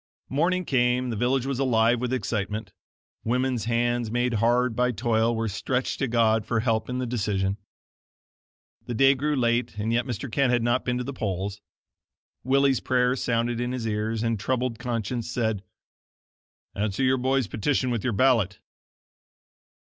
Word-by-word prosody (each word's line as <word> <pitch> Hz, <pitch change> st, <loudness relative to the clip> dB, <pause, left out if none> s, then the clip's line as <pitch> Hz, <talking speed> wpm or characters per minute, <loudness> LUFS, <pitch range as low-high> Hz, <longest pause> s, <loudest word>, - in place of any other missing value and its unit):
Morning 175 Hz, +6 st, +1 dB
came, 125 Hz, -2 st, +1 dB
the -, -, -2 dB
village 125 Hz, +3 st, +1 dB
was 135 Hz, -2 st, -2 dB
alive 120 Hz, -2 st, +3 dB
with 125 Hz, -1 st, -2 dB
excitement. 110 Hz, -3 st, -3 dB, 0.5 s
Women's 125 Hz, 0 st, 0 dB
hands, 120 Hz, 0 st, 0 dB
made 120 Hz, +1 st, 0 dB
hard 120 Hz, +1 st, +2 dB
by 125 Hz, 0 st, +2 dB
toil, 115 Hz, +1 st, +1 dB
were 115 Hz, 0 st, -1 dB
stretched 125 Hz, +5 st, -2 dB
to 135 Hz, -, 0 dB
God 115 Hz, -2 st, +2 dB
for 115 Hz, +1 st, 0 dB
help 110 Hz, -1 st, 0 dB
in 125 Hz, -, -2 dB
the 130 Hz, -, -1 dB
decision. 100 Hz, -4 st, -1 dB, 1.3 s
The 120 Hz, -, -3 dB
day 135 Hz, +4 st, +6 dB
grew 145 Hz, +3 st, -1 dB
late 120 Hz, -3 st, 0 dB
and 110 Hz, +2 st, -1 dB
yet 120 Hz, +1 st, +1 dB
Mr. 120 Hz, +1 st, -4 dB
Kent 125 Hz, +1 st, +2 dB
had 120 Hz, -2 st, +2 dB
not 120 Hz, +2 st, +1 dB
been 125 Hz, -1 st, 0 dB
to 125 Hz, -, -2 dB
the 140 Hz, +3 st, -5 dB
polls. 100 Hz, -2 st, -3 dB, 0.8 s
Willie's 135 Hz, 0 st, +3 dB
prayer 125 Hz, 0 st, +1 dB
sounded 120 Hz, -1 st, -1 dB
in 125 Hz, +1 st, -2 dB
his 125 Hz, -3 st, -3 dB
ears, 110 Hz, +1 st, -1 dB
and 115 Hz, -2 st, 0 dB
troubled 125 Hz, +2 st, -1 dB
conscience 120 Hz, -1 st, -3 dB
said: 110 Hz, -5 st, -1 dB, 1.1 s
"Answer 105 Hz, +4 st, -1 dB
your 130 Hz, 0 st, +3 dB
boy's 130 Hz, 0 st, +1 dB
petition 125 Hz, +6 st, 0 dB
with 115 Hz, -4 st, -2 dB
your 125 Hz, -, 0 dB
ballot." 115 Hz, -4 st, +2 dB
120 Hz, 165 wpm, -26 LUFS, 110-130 Hz, 1.3 s, day